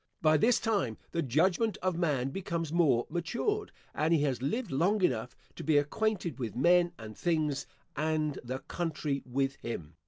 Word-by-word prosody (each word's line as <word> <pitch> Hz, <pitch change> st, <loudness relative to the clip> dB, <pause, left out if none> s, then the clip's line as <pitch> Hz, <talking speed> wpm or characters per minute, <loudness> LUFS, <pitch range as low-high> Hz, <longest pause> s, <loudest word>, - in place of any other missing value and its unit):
By 155 Hz, -1 st, +4 dB
this 230 Hz, +10 st, +4 dB
time 195 Hz, -, 0 dB
the 170 Hz, -, 0 dB
judgment 175 Hz, -, +2 dB
of 185 Hz, -2 st, +1 dB
man 145 Hz, -7 st, 0 dB
becomes 165 Hz, -2 st, -3 dB
more 140 Hz, -9 st, +3 dB
matured, 240 Hz, -, -2 dB, 0.2 s
and 155 Hz, +2 st, +1 dB
he 160 Hz, -3 st, +4 dB
has 130 Hz, -5 st, 0 dB
lived 200 Hz, -, -1 dB
long 185 Hz, +9 st, +2 dB
enough 125 Hz, -5 st, 0 dB, 0.2 s
to -, -, -6 dB
be 155 Hz, 0 st, +3 dB
acquainted 175 Hz, +3 st, 0 dB
with 115 Hz, -4 st, -4 dB
men 175 Hz, +6 st, +4 dB
and 110 Hz, -1 st, -9 dB
things, 155 Hz, -5 st, 0 dB, 0.3 s
and 155 Hz, -1 st, 0 dB
the 130 Hz, +2 st, -3 dB
country 150 Hz, -3 st, -3 dB
with 135 Hz, +2 st, -1 dB
him. 85 Hz, -9 st, -6 dB
155 Hz, 165 wpm, -31 LUFS, 135-175 Hz, 0.3 s, By